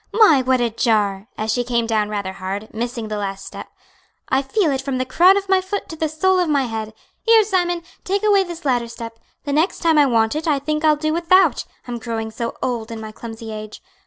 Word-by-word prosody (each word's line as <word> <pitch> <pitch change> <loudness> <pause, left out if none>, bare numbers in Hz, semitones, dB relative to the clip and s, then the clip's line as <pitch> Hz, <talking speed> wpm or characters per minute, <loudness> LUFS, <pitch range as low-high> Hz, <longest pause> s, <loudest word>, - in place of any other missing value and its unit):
My, 415 - +6
what 255 0 +2
a 240 -1 0
jar!" 210 -3 0
as 215 0 -1
she 245 - 0
came 235 -1 0
down 215 -2 0
rather 200 -3 -3
hard, 195 +3 -6
missing 235 0 -4
the 210 -1 -3
last 195 -1 -4
step - - -8 0.6
"I 265 - +2
feel 320 +4 +1
it 270 -1 -1
from 270 -1 -3
the 255 - -1
crown 360 +9 +5
of 395 0 -3
my 380 -1 +3
foot 380 +2 -4
to 320 - -6
the 315 -1 -1
sole 370 +5 +2
of 355 -3 +1
my 285 -2 +2
head. 220 -2 -5 0.3
Here, 450 -1 +5
Simon, 350 -4 0 0.2
take 400 +2 -1
away 405 -2 +4
this 345 -3 -9
ladder 245 -3 +1
step; 230 -1 -9 0.2
the 285 - -3
next 315 +6 +1
time 325 -3 +3
I 290 - +5
want 225 0 +2
it 315 +2 -3
I 300 -3 +3
think 305 +3 -2
I'll 310 -1 +5
do 310 +1 -1
without; 340 -2 +3 0.2
I'm 240 -1 -4
growing 225 -1 -4
so 230 +1 -5
old 235 -3 -2
in 225 -1 -6
my 220 0 -7
clumsy 225 0 -8
age. 215 0 -8
255 Hz, 235 wpm, -20 LUFS, 225-330 Hz, 0.6 s, My